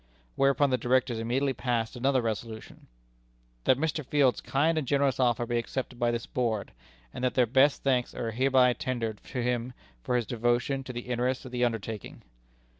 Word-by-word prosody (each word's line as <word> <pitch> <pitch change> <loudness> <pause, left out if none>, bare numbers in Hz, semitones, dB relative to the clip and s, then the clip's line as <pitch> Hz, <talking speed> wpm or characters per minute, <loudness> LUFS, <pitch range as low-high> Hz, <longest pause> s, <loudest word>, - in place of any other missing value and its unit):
Whereupon 140 0 +3
the 130 - +1
Directors 125 -1 +1
immediately 130 +4 0
passed 120 -1 -2
another 130 0 +1
resolution: 110 0 -5 0.8
"That 130 - +4
Mr. 155 +1 -1
Field's 135 -2 +2
kind 155 +5 +1
and 140 - -5
generous 140 -1 +2
offer 120 -2 +2
be 120 0 0
accepted 125 +1 -5
by 120 - +2
this 120 0 -2
Board; 115 -5 -2 0.4
and - - -6
that 125 - +1
their 125 - +4
best 135 +4 +3
thanks 130 -3 +1
are 115 -1 -3
hereby 130 +1 +4
tendered 115 -4 -3
to 125 -3 -3
him 125 0 -1 0.3
for 125 - 0
his 120 -2 +1
devotion 120 +4 0
to 130 - -5
the 120 -1 -5
interests 125 +1 -2
of 130 - -8
the 125 0 -1
undertaking." 115 -3 -3
125 Hz, 180 wpm, -28 LUFS, 120-135 Hz, 0.8 s, That